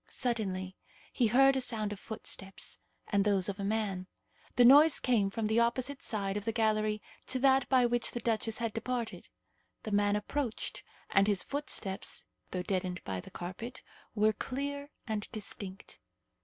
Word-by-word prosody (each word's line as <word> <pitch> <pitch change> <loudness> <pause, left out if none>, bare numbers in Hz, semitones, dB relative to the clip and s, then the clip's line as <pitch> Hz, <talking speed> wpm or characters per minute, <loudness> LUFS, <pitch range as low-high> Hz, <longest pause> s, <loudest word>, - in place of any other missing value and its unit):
Suddenly 190 -6 -2 0.4
he 240 - +3
heard 270 +4 +5
a 265 - +1
sound 215 -4 -2
of 200 - -9
footsteps, 200 -3 -4 0.3
and 200 -1 +3
those 195 -3 +2
of 200 0 -4
a - - -2
man. 200 -3 -1 0.5
The 245 - +6
noise 290 +4 +8
came 220 -6 +2
from 220 +2 -2
the 220 +2 +3
opposite 255 +4 +1
side 200 -2 -1
of 205 - -4
the 225 - +1
gallery 215 -1 +1 0.2
to 260 - 0
that 265 0 +4
by 255 -2 +5
which 240 0 +1
the 240 - -3
duchess 225 -1 0
had 230 -2 -2
departed. 235 0 -3 0.5
The 215 - -5
man 205 0 +3
approached, 230 +3 -3 0.3
and 195 0 +4
his 205 -3 +2
footsteps, 240 -9 -2 0.2
though 180 -1 -3
deadened 185 -2 -2
by 95 -1 -3
the - - -10
carpet, 225 +8 -7 0.3
were 215 0 +4
clear 280 +5 -4 0.2
and 215 -2 -3
distinct. 200 -2 -7
220 Hz, 165 wpm, -32 LUFS, 200-245 Hz, 0.5 s, noise